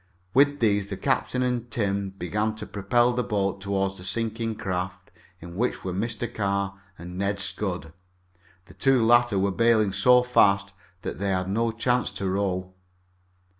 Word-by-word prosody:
With 145 +1 +4
these 105 -3 +2
the 100 -2 -5
captain 125 0 0
and 120 -1 -1
Tim 100 -3 -1
began 105 +4 -2
to 110 - -7
propel 120 +5 +1
the 125 - 0
boat 100 -4 -1
toward 95 0 -1
the 90 - -10
sinking 115 +3 -2
craft 90 -2 -4 0.3
in 85 +1 -10
which 120 +6 -1
were 95 - -3
Mr. 110 +4 -2
Carr 100 -1 -1 0.2
and 90 +2 -8
Ned 100 0 0
Scudd. 90 -5 -4 0.7
The 95 - -16
two 125 +4 +3
latter 120 -2 +4
were 100 +1 +2
bailing 110 -1 +3
so 125 +3 +5
fast 100 -5 +3 0.3
that - - -5
they 100 0 -1
had 95 -1 0
no 115 +4 +1
chance 125 +2 0
to 95 - -3
row. 95 -1 -1
100 Hz, 165 wpm, -26 LUFS, 95-115 Hz, 0.7 s, so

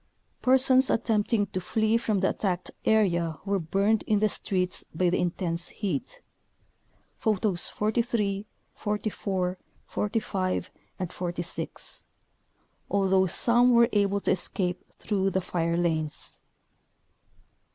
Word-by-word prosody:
Persons 260 0 +5
attempting 220 -1 +1
to 185 -1 -4
flee 220 +4 +1
from 215 -4 +1
the 190 - +3
attacked 180 -3 -2
area 175 -7 +2
were 200 -1 +1
burned 200 +6 +1
in 215 - +3
the 215 +1 +2
streets 185 -4 -1
by 175 +1 +2
the - - +1
intense 170 -1 -1
heat 200 - -4 1.0
(Photos 210 -4 +1
43, 210 -2 -1 0.3
44, 195 -3 -2 0.3
45, 200 -3 -2 0.3
and 180 -2 -4
46), 175 0 -5 0.9
although 190 -1 +3
some 240 +7 +4
were 235 0 +6
able 200 -1 +2
to - - +1
escape 180 0 -1
through 195 -2 0
the 190 - 0
fire 170 -2 -1
lanes. 160 -3 -2
195 Hz, 110 wpm, -27 LUFS, 180-215 Hz, 1.0 s, were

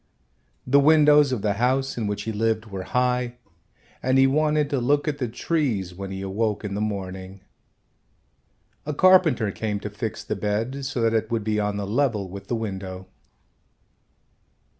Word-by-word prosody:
The 140 +3 +4
windows 150 -1 +5
of 120 -6 -2
the 105 -2 +2
house 135 +2 +1
in 115 -3 -2
which 105 0 -3
he 115 - -3
lived 110 0 0
were 100 -3 -6
high 125 -1 0 0.7
and 130 +1 +2
he 135 - +6
wanted 150 +2 +2
to 140 - +1
look 145 +5 +1
at 145 -1 -2
the 125 - -1
trees 115 - -1
when 95 +1 -7
he 95 0 -5
awoke 105 +2 -1
in 100 - -4
the 100 - -2
morning. 95 -2 -5 1.4
A 150 0 -4
carpenter 180 - +4
came 105 0 -3
to 105 - -5
fix 110 +1 -5
the - - -3
bed 115 +7 -2
so 130 -3 -2
that 115 0 +2
it 110 - 0
would 115 -2 -1
be 105 0 0
on 105 -1 -1
a 100 - -3
level 110 -2 0
with 100 +1 -9
the 120 - -1
window. 95 -4 -5
115 Hz, 175 wpm, -24 LUFS, 100-135 Hz, 1.4 s, he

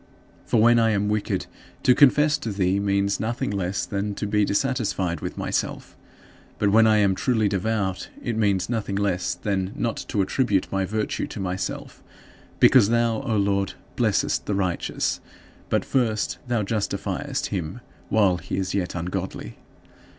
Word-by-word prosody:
For 115 - +2
when 115 +2 +6
I 115 0 +3
am 105 -1 +1
wicked, 105 0 -1 0.4
to 125 - +6
confess 150 +2 +5
to 115 -6 -4
thee 95 -1 +1
means 100 0 +1
nothing 115 -2 -2
less 95 -1 -2
than 100 0 -3
to 105 - -3
be 105 0 +2
dissatisfied 100 - 0
with - - -5
myself; - - -3 0.6
but 100 -1 +2
when 110 +1 +6
I 110 -1 +5
am 100 -2 +3
truly 110 +1 +1
devout, 100 -1 -1
it 120 - -3
means 100 -4 +1
nothing 110 -4 -2
less 100 -3 0
than 95 -1 -2
not 115 -1 -2
to 100 - +1
attribute 100 -2 0
my 95 -1 0
virtue 110 +2 -2
to - - -8
myself; 95 -1 -4 0.6
because 115 -6 +6
thou, 115 0 +1
O 120 -6 -1
Lord, 100 -1 +1 0.2
blessest - - +1
the 105 - 0
righteous, 95 -3 -1 0.5
but - - +1
first 115 -5 0
thou 120 -3 0
justifiest 105 +1 -2
him 90 +3 -4 0.3
while 100 -4 +3
he 85 - -5
is 95 -1 -2
yet 95 -3 -2
ungodly. 90 -7 -4
100 Hz, 160 wpm, -24 LUFS, 95-110 Hz, 0.6 s, when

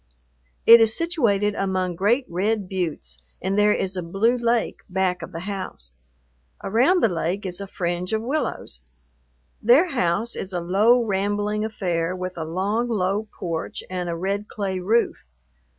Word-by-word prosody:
It 230 0 +10
is 225 -1 +3
situated 230 - +1
among 185 -2 -1
great 230 +9 +2
red 200 +3 -1
buttes, 155 - -4 0.2
and 190 +1 -1
there 210 0 +4
is 190 -2 -1
a 180 - -2
blue 195 +8 +1
lake 235 -1 0
back 185 -1 0
of 165 - -7
the 165 - -6
house. 185 - -6 0.7
Around 260 - +3
the - - +7
lake 180 +2 -2
is 180 +1 -3
a 200 - -5
fringe 175 -1 -3
of 220 0 0
willows. 245 - -3 0.8
Their 265 - +5
house 225 - 0
is 190 0 -5
a 175 - -1
low, 210 +8 +3
rambling 205 +1 -1
affair, 180 -5 -2
with 185 0 -5
a 160 - -4
long, 200 +8 -1
low 205 0 0
porch 165 -2 -5
and 180 -1 -3
a 170 - -2
red 200 +4 -2
clay 195 -3 -3
roof. 215 - 0
195 Hz, 160 wpm, -23 LUFS, 180-220 Hz, 0.8 s, It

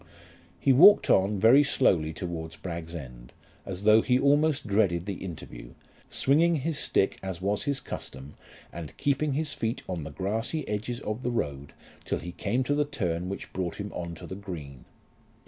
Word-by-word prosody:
He 135 - +4
walked 195 +10 +7
on 95 +1 +3
very 120 +8 +7
slowly 90 - +2
towards 80 -1 -6
Bragg's 85 -2 -6
End, 60 -6 -9 0.4
as 95 0 -5
though 110 +1 +6
he 125 +2 +2
almost 145 +2 +2
dreaded 100 -5 +1
the 100 -2 -5
interview, 75 -9 -9 0.3
swinging 165 +5 +3
his 155 +1 -2
stick 95 - +1
as 95 -3 -5
was 100 +6 -1
his 140 -2 0
custom, 70 - -8 0.4
and 85 -3 -8
keeping 145 +1 0
his 150 +1 -1
feet 115 +1 -3
on 90 -4 -4
the 80 - -6
grassy 110 - -2
edges 110 +4 -3
of 110 0 -4
the 125 - -1
road 70 - -3 0.3
till - - -2
he 90 - -7
came 110 +8 -1
to 145 - 0
the 150 +1 +2
turn 90 - -2
which 100 - -7
brought 90 -2 -3
him 100 0 -6
on 85 -1 -5
to - - -10
the - - -7
green. 80 -10 -8
100 Hz, 180 wpm, -28 LUFS, 85-130 Hz, 0.4 s, walked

